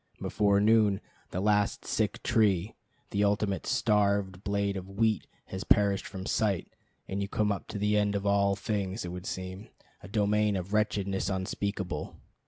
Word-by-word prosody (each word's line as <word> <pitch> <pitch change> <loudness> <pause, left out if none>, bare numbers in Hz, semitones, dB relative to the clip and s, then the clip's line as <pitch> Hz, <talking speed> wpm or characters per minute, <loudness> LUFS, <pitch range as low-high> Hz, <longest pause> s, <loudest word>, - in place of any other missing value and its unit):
Before 100 -1 +2
noon 105 -2 +4 0.3
the 90 - -3
last 105 0 +1
sick - - -1
tree, 100 -3 +2 0.4
the 100 - +1
ultimate 100 -1 0
starved 100 -3 +1
blade 100 -1 0
of 95 0 -6
wheat, 110 -1 +1 0.2
has 95 +1 -5
perished 100 -2 +3
from 95 -1 -7
sight, 100 -6 0 0.4
and 100 +1 -2
you 100 - -1
come 105 0 +1
to - - -5
the 105 +1 +2
end 105 0 +1
of 100 0 -2
all 100 0 +3
things, 100 0 -2
it - - -4
would 90 +1 -6
seem; 95 +3 -6 0.3
a - - -10
domain 105 0 +2
of 95 +2 -4
wretchedness 100 -2 0
unspeakable. 95 0 -3
100 Hz, 160 wpm, -29 LUFS, 95-105 Hz, 0.4 s, noon